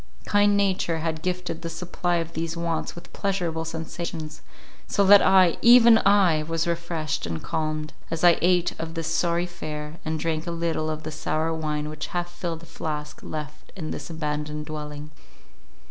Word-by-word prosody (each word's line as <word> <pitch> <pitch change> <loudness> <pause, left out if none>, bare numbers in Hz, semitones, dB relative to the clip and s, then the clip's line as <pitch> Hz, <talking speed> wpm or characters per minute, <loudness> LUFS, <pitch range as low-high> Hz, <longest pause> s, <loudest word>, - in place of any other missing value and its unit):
Kind 205 0 +4
nature 190 -4 +1
had 160 -1 -2
gifted 180 -1 -3
the 165 - -4
supply 175 +1 -2
of 165 -1 -2
these 165 +1 -3
wants 170 -1 -2
with 175 - -12
pleasurable 175 -5 -1
sensations, 160 -1 -5 0.5
so 200 - +2
that 200 +1 +9
I—even 225 +6 +7
I!—was 165 -5 +3
refreshed 170 - -2
and 80 -1 -4
calmed, 155 -1 -2 0.2
as 165 0 -3
I 175 -1 +6
ate 180 0 +3
of 165 0 -5
this 165 0 -2
sorry 170 +1 +1
fare, 155 -2 -6
and 160 0 -2
drank 160 -1 -2
a - - -1
little 165 -2 -1
of 155 0 -4
the 155 - -5
sour 155 +1 -1
wine 150 -2 -2
which 155 0 -5
half 175 0 -2
filled 170 -2 -5
a - - -10
flask 150 -2 -5
left 150 -1 -7
in 160 -5 -5
this - - -6
abandoned 150 -1 -3
dwelling. 150 -1 -7
165 Hz, 165 wpm, -25 LUFS, 155-175 Hz, 0.5 s, that